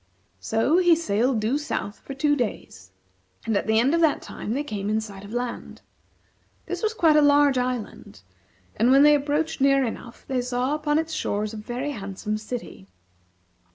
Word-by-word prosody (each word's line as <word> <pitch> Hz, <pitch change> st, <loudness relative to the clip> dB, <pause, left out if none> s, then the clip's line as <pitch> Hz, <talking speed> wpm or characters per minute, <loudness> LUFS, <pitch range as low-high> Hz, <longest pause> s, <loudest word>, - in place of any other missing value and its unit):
So 245 Hz, +10 st, +1 dB
he 350 Hz, -2 st, +5 dB
sailed 245 Hz, -5 st, 0 dB
due 240 Hz, +7 st, 0 dB
south 210 Hz, -8 st, -4 dB
for 275 Hz, -, -9 dB
two 290 Hz, +2 st, +2 dB
days, 150 Hz, -, -5 dB, 0.6 s
and 225 Hz, -, 0 dB
at 200 Hz, -, -1 dB
the 220 Hz, 0 st, +3 dB
end 260 Hz, +6 st, +2 dB
of 335 Hz, -, +2 dB
that 315 Hz, -3 st, +3 dB
time 215 Hz, -, -6 dB
they 285 Hz, +4 st, -1 dB
came 205 Hz, -7 st, -4 dB
in 215 Hz, +1 st, +1 dB
sight 200 Hz, -3 st, -8 dB
of 200 Hz, -, -10 dB
land. 245 Hz, 0 st, -5 dB, 0.8 s
This -, -, -5 dB
was 440 Hz, 0 st, -1 dB
quite 325 Hz, -7 st, +4 dB
a 300 Hz, -, +6 dB
large 285 Hz, -2 st, +4 dB
island, 245 Hz, -, -5 dB, 0.5 s
and 230 Hz, +3 st, +2 dB
when 270 Hz, +2 st, +6 dB
they 295 Hz, 0 st, +7 dB
approached 295 Hz, +1 st, -1 dB
near 275 Hz, -1 st, +4 dB
enough, 235 Hz, +1 st, -8 dB
they 260 Hz, -2 st, -1 dB
saw 250 Hz, +2 st, -1 dB
upon 300 Hz, 0 st, 0 dB
its 320 Hz, 0 st, -2 dB
shores 210 Hz, -7 st, -2 dB
a -, -, -6 dB
very 245 Hz, +6 st, -4 dB
handsome 210 Hz, -2 st, -4 dB
city. 215 Hz, -, -7 dB
250 Hz, 185 wpm, -24 LUFS, 215-290 Hz, 0.8 s, they